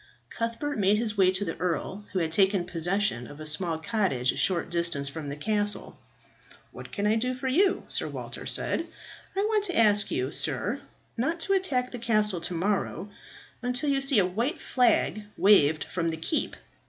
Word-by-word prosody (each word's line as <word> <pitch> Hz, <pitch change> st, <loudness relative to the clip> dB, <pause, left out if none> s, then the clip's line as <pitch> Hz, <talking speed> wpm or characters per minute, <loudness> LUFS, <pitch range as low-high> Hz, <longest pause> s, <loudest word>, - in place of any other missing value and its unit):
Cuthbert 230 Hz, +4 st, -3 dB
made 200 Hz, +1 st, +3 dB
his 215 Hz, -1 st, -1 dB
way 190 Hz, -2 st, +4 dB
to 190 Hz, +2 st, -1 dB
the 165 Hz, -, -3 dB
earl, 180 Hz, +3 st, -3 dB
who -, -, -3 dB
had 165 Hz, -3 st, 0 dB
taken 190 Hz, 0 st, +2 dB
possession 175 Hz, -, -1 dB
of 145 Hz, -, -12 dB
a 155 Hz, -, -7 dB
small 160 Hz, +2 st, -1 dB
cottage 160 Hz, -, 0 dB
a -, -, -8 dB
short 175 Hz, -2 st, 0 dB
distance 170 Hz, -5 st, 0 dB
from 145 Hz, +1 st, -6 dB
the 140 Hz, -, -4 dB
castle. 205 Hz, +5 st, -1 dB, 0.8 s
"What -, -, -10 dB
can 205 Hz, -, -2 dB
I 210 Hz, -, +3 dB
do 250 Hz, +3 st, 0 dB
for 255 Hz, +1 st, -4 dB
you?" 370 Hz, +9 st, +2 dB
Sir -, -, 0 dB
Walter -, -, -6 dB
said. 335 Hz, -, 0 dB, 0.5 s
"I 390 Hz, -, +1 dB
want 425 Hz, 0 st, +1 dB
to 360 Hz, -4 st, -2 dB
ask 210 Hz, -2 st, +4 dB
you, 130 Hz, +2 st, -1 dB
sir, 185 Hz, -, 0 dB, 0.4 s
not 320 Hz, +9 st, -1 dB
to 390 Hz, -, +1 dB
attack 275 Hz, -10 st, 0 dB
the 245 Hz, -, -6 dB
castle 215 Hz, -6 st, +2 dB
to 180 Hz, -, -2 dB
morrow 195 Hz, +1 st, -1 dB, 0.5 s
until 250 Hz, +4 st, +1 dB
you 275 Hz, -1 st, +1 dB
see 270 Hz, -2 st, +3 dB
a 195 Hz, -, +5 dB
white 235 Hz, -, -2 dB
flag 245 Hz, -6 st, +2 dB, 0.2 s
waved 155 Hz, -7 st, +5 dB
from 170 Hz, -2 st, -3 dB
the 160 Hz, -, -3 dB
keep." 165 Hz, -, -1 dB
205 Hz, 190 wpm, -27 LUFS, 170-250 Hz, 0.8 s, a